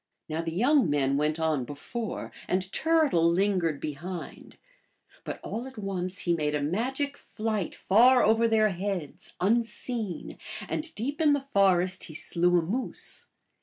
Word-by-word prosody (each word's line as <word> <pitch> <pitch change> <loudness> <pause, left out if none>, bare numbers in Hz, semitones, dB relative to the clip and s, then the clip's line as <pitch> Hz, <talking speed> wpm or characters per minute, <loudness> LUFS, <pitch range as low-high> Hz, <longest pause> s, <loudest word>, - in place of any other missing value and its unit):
Now 160 +1 -2
the 165 0 -3
young 245 - +3
men 140 -2 +2
went 150 +2 0
on 155 -5 +1
before, 200 - -5 0.2
and 185 +1 0
Turtle 305 - +3
lingered 175 -5 +1
behind; 165 +4 -7 0.7
but - - -5
all 240 +3 -4
at 265 -2 -12
once 190 -3 -2
he 175 - +1
made 150 -2 0
a - - +1
imigic 255 - -1
flight 215 -8 -3
far 245 +6 +5
over 225 +2 +4
their 220 -1 +4
heads, 185 -4 -4
unseen, 225 -1 -1 0.3
and 315 +1 -2
deep 280 +8 -3
in/ 300 -2 +5
the 280 -1 -1
forest 185 -2 +3
he 155 - -10
slew 175 +2 +2
a 170 - +2
moose. 225 +11 -4
190 Hz, 150 wpm, -28 LUFS, 165-235 Hz, 0.7 s, far